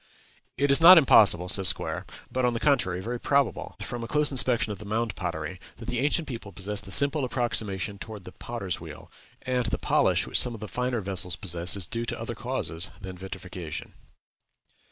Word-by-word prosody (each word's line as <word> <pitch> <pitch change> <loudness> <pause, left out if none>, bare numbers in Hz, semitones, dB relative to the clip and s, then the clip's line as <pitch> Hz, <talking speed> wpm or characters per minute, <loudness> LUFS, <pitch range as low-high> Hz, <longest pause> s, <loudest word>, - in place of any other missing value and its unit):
"It 140 +1 +2
is 140 - +6
not 180 +2 +10
impossible," 100 - +6
says 95 0 +4
Squier, - - -5 0.2
"but, 130 - -1
on 120 -1 +1
the - - -2
contrary, 115 -12 +1
very 120 +4 -4
probable, 140 -1 0
from 120 -1 -5
a - - -5
close 150 +3 +1
inspection 125 -4 +2
of 100 - -7
the 105 - -9
mound 110 0 -2
pottery, 85 0 -5 0.2
that 115 - -10
the 125 - -2
ancient 150 +3 +2
people 115 -6 -7
possessed 100 +3 -3
the 95 - -8
simple 140 - +3
approximation 105 -6 -2
toward 105 -3 -8
the 90 - -10
potter's 100 -8 -5
wheel; 85 +1 -11 0.3
and 125 -3 -1
the - - -1
polish - - +1
which - - +1
some 120 -1 0
of - - -10
the 105 - -7
finer 125 +1 -2
vessels 95 -2 -1
possess 90 -2 +1
is 95 - +1
due 115 +6 -3
to - - -4
other - - -5
causes 80 +5 -3
than 95 -2 -8
vitrification." 90 -3 -8
110 Hz, 195 wpm, -26 LUFS, 95-125 Hz, 0.3 s, not